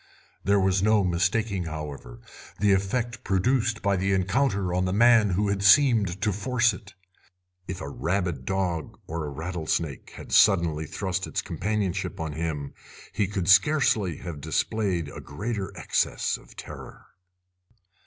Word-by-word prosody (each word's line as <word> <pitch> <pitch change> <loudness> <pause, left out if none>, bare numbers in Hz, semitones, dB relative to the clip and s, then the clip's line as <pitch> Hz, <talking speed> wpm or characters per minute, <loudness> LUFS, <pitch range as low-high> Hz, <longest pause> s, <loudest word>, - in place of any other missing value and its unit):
There 100 +1 +3
was 95 0 +2
no 105 0 +3
mistaking, 95 +2 0
however, 75 -6 -7 0.4
the 100 -1 +4
effect 115 +5 -1
produced 115 +3 +1
by 100 -1 +2
the 95 +1 0
encounter 95 -1 +1
on 90 +1 +1
the 90 - -1
man 115 -1 +5
who 100 +3 0
had 100 0 -1
seemed 100 - +5
to 105 -2 +1
force 120 +2 +1
it. 90 - -12 0.7
If 95 -1 -5
a - - -5
rabid 85 0 -2
dog 90 -2 -2
or 85 0 -4
a 75 - -4
rattlesnake 80 -2 -3
had - - -10
suddenly 85 -6 +4
thrust 95 +1 -3
its - - -3
companionship 100 -3 -2
on 80 -2 -3
him 75 -3 -4 0.4
he 100 - 0
could 95 -3 -3
scarcely 100 - +4
have 85 -5 -7
displayed 95 -2 -1
a - - -9
greater 100 +6 -4
access - - 0
of - - -14
terror. - - -10
95 Hz, 145 wpm, -26 LUFS, 85-105 Hz, 0.7 s, man